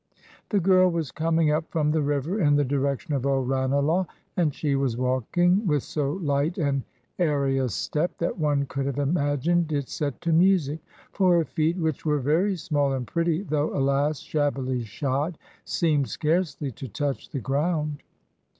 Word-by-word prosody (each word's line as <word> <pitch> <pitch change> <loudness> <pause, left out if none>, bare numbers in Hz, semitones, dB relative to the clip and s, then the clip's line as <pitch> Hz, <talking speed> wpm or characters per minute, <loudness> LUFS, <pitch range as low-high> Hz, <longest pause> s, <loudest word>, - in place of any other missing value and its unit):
The 205 - +2
girl 185 0 +5
was 165 -5 -2
coming 160 -1 +1
up 155 +2 -1
from 150 -2 +1
the 155 0 +1
river 145 +7 -1
in 145 -3 +4
the 145 0 +3
direction 140 +2 -1
of 135 -3 -1
old 135 -2 +1
Ranelagh, 140 +7 +1 0.3
and 170 -5 +2
she 145 +1 -1
was 135 -4 0
walking 155 - +2
with 150 -4 +1
so 145 -2 -2
light 150 -2 -1
and 140 -5 0 0.4
airy 140 -5 +1
a 130 -2 0
step 150 - -2
that 170 - -2
one 145 -2 +1
could 135 0 -3
have 140 - -3
imagined 145 +3 +1
it 140 -3 -2
set 145 -4 -3
to 170 -1 0
music 165 -4 +3 0.3
for 185 -3 +4
her 165 - +2
feet, 160 +2 0
which 160 -5 -1
were 150 -1 +1
very 160 +9 +1
small 145 -5 0
and 130 -2 -2
pretty, 170 - 0
though, 150 -6 -1
alas! 140 +2 +1
shabbily 135 -4 -1
shod, 140 - -2 0.3
seemed 150 -6 +1
scarcely 155 -3 -1
to 130 +3 -8
touch 140 +5 -3
the 140 - -4
ground. 150 +3 -1
150 Hz, 170 wpm, -25 LUFS, 140-165 Hz, 0.4 s, girl